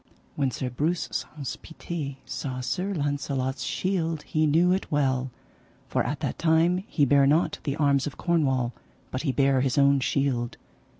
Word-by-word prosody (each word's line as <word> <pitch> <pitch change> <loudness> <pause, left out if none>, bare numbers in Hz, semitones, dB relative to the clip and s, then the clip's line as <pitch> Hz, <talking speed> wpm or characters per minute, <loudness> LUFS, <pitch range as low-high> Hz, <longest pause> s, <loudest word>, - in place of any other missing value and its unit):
When 140 -2 +1
Sir 125 0 -4
Breuse 160 +8 0
Saunce 140 -5 -4
Pité 160 -4 -6
saw 130 -2 -4
Sir 185 +10 -2
Launcelot's 140 -4 -2
shield 165 0 -1
he 155 0 +1
knew 170 +4 +4
it 190 +1 -1
well, 135 -3 +1 0.6
for - - +1
at - - -3
that - - -3
time 165 +2 +3
he 145 - +2
bare 140 0 +5
not 155 +4 +2
the 140 -2 -1
arms 140 -3 +2
of 145 - -7
Cornwall, 135 -8 +1 0.4
but 130 - -2
he 145 - 0
bare 135 -1 +3
his 130 0 0
own 140 0 +5
shield. 130 -3 0
140 Hz, 165 wpm, -26 LUFS, 130-160 Hz, 0.6 s, bare